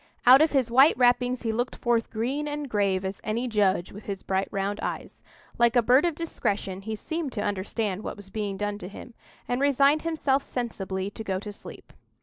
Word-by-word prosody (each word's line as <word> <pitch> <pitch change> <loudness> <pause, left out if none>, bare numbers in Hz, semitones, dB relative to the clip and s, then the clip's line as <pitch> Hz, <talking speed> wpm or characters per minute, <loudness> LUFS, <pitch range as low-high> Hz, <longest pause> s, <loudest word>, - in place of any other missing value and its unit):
Out 260 +3 +9
of 315 - +4
his 260 -4 +1
white 270 +5 +6
wrappings 245 0 +2
he 225 - 0
looked 245 +3 -2
forth 235 -2 0
green 260 +7 -2
and 295 0 -4
grave 200 -4 0
as 190 +1 -5
any 230 +4 -1
judge 200 -5 +1
with 205 +2 -11
his 195 -2 -5
bright 190 0 0
round 200 +1 -2
eyes. - - -5 0.4
Like 235 +1 +4
a 240 - +5
bird 255 +7 +5
of 340 -3 0
discretion, 200 - -3
he 220 +2 -4
seemed 315 +6 -4
to 205 - -2
understand 205 0 -2
what - - -5
was 205 -2 -13
being 205 -2 -3
done 205 0 -3
to 180 - -7
him, 220 +5 -11 0.3
and 245 +2 -1
resigned 280 +2 +4
himself 305 -4 +1
sensibly 195 -7 -4
to 220 - -7
go 190 -3 -2
to 210 +2 -6
sleep. 205 - -12
225 Hz, 205 wpm, -26 LUFS, 200-260 Hz, 0.4 s, Out